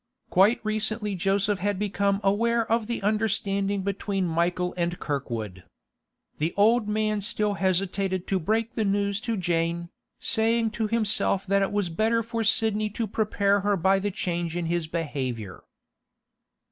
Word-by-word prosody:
Quite 195 +6 +4
recently 215 -1 -1
Joseph 195 +2 +1
had 205 +1 -1
become 200 0 0
aware 230 +4 +2
of 230 -1 +1
the 235 -4 -3
understanding 200 -2 0
between 195 -1 -1
Michael 175 +2 0
and 175 0 -1
Kirkwood. 115 - -4 0.8
The 160 +3 -1
old 220 +2 +4
man 215 0 0
still 210 0 0
hesitated 190 0 0
to 195 - 0
break 220 +7 0
the 220 - -1
news 200 0 0
to 230 -1 -2
Jane, 170 -1 -1 0.3
saying 225 0 +2
to 220 0 -2
himself 210 -3 +1
that 200 +1 +2
it 195 - 0
was 205 -3 0
better 225 +6 +1
for 230 0 -3
Sidney 215 -1 +2
to 225 +2 -3
prepare 205 -1 +1
her 200 0 +1
by 190 +3 +3
the 205 +1 -1
change 175 -3 -3
in 175 -1 -2
his 170 -1 -1
behaviour. 130 - -4
200 Hz, 150 wpm, -26 LUFS, 180-215 Hz, 0.8 s, Quite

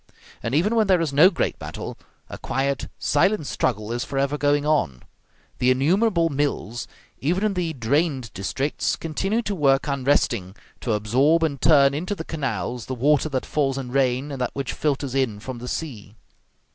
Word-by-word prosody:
And 115 +4 -2
even 205 +9 +2
when 220 -2 +3
there 185 -2 +4
is 160 -4 -1
no 155 +7 +7
great 180 - -2
battle, - - -6 0.3
a - - -8
quiet, 135 +1 -1
silent 175 +3 +2
struggle 110 -5 -1
is 120 +1 -1
forever 140 +1 -1
going 145 0 +1
on. 145 - 0 0.6
The 125 - +3
innumerable 170 - +3
mills, 135 -6 -2 0.3
even 175 +8 0
in 215 -2 +1
the 175 -3 -1
drained 135 -1 0
districts, 135 +9 -1
continue 195 +8 -2
to 205 - -2
work 140 -6 +2
unresting, 130 -9 0 0.2
to 115 - -1
absorb 130 +10 +3
and 140 -5 -1
turn 140 -3 +5
into 180 +8 -2
the 160 - -6
canals 135 -6 -3
the 130 - -3
water 145 +5 +2
that 130 -3 -2
falls 135 -3 0
in 130 -2 -5
rain 135 +1 +1
and 135 -2 -5
that 125 - -2
which 140 -1 -3
filters 140 -3 -1
in 130 -6 0
from 125 +2 -7
the 125 - -7
sea. 115 -9 -5
140 Hz, 175 wpm, -23 LUFS, 125-160 Hz, 0.6 s, no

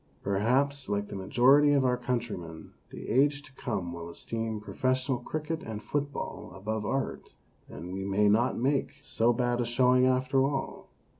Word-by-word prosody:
Per 100 0 0
haps, 135 +5 +1
like 100 0 -1
the - - -6
majority 135 +9 +4
of 140 -2 +3
our 125 -1 +3
countrymen, 115 -10 -4 0.2
the - - -9
age 145 +2 +2
to 135 - -16
come 100 -10 -4
will 85 0 -7
esteem 110 +5 -4
professional 130 +4 -1
cricket 155 +5 -4
and 110 -1 -6
football 145 -1 -4
above 105 +2 -3
art, 135 0 -3 0.3
and 90 +2 -8
we 95 0 -4
may 100 +2 +2
not 115 +5 +3
make 135 +3 0
so 120 -4 +2
bad 120 0 0
a - - +2
showing 125 +2 +4
after 130 +1 +2
all 135 0 -3
125 Hz, 165 wpm, -29 LUFS, 105-135 Hz, 0.3 s, majority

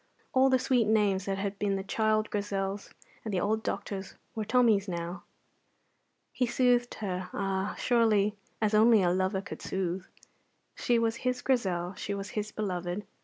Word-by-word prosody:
All 265 +1 +5
the 260 - +5
sweet 250 -3 +2
names 205 -3 +2
that 195 -1 -1
had 200 0 -3
been 200 -1 +1
the 195 - -3
child 215 +1 +1
Grizel's 200 -1 -2 0.3
and 220 - -4
the 190 - +1
old 215 +3 0
doctor's 195 -2 -4 0.2
were 220 - -2
Tommy's 215 -3 +3
now. 175 0 -5 1.1
He 250 - +1
soothed 245 0 +2
her, 185 -3 -4
ah, 195 0 -1
surely 220 -4 +3 0.2
as 215 -1 +1
only 220 -1 +6
a 175 - +3
lover 190 +1 0
could - - -8
soothe. 185 0 -2 0.7
She 240 - +1
was 230 0 +1
his 250 0 -2
Grizel, 185 -9 0
she 200 +1 -4
was 195 0 -6
his 215 0 -3
beloved. 185 -2 -3
205 Hz, 165 wpm, -29 LUFS, 190-225 Hz, 1.1 s, only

